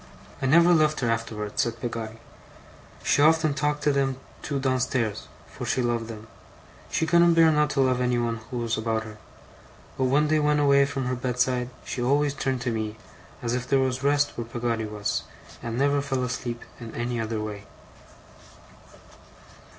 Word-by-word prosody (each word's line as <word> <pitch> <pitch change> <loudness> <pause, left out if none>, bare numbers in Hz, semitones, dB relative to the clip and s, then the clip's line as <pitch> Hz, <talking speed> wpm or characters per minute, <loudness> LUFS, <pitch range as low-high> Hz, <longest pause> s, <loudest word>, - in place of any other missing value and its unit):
'I 135 - +1
never 170 +5 +6
left 155 -2 +3
her 120 -2 +1
afterwards,' 110 -2 -2
said 115 0 -2
Peggotty. 115 -2 -5 0.9
'She - - +3
often 155 0 +4
talked 150 0 -1
to 150 - +4
them 135 -2 0 0.2
two 140 -2 -2
downstairs 125 -5 0 0.2
for - - -9
she 130 - 0
loved 120 -1 -1
them; 110 -1 -8 0.6
she - - 0
couldn't 170 +1 +5
bear 165 -1 +6
not 150 -1 +2
to 140 -2 +1
love 130 -1 +2
anyone 120 -2 0
who 125 - -4
was 115 -1 -1
about 110 0 -1
her 110 -1 -11 0.8
but 130 - +3
when 145 +4 +3
they 155 0 +3
went 150 0 +2
away 140 -1 +5
from 135 -2 -3
her 125 - -1
bed 125 0 -3
side, 125 -1 +1 0.2
she 125 - -4
always 140 +3 +2
turned 135 -2 -2
to 125 -1 -1
me, 110 -1 -3 0.5
as 120 0 -1
if 125 0 -2
there 135 - +3
was 130 -1 0
rest 145 0 +2
where 120 - -4
Peggotty 115 -1 -2
was, 105 -1 -2 0.4
and 115 0 -4
never 140 +1 +2
fell 135 -2 -1
asleep 120 -1 -4 0.2
in 115 -2 -9
any 120 0 -2
other 110 0 -2
way. 105 -1 -5
125 Hz, 180 wpm, -26 LUFS, 115-145 Hz, 0.9 s, never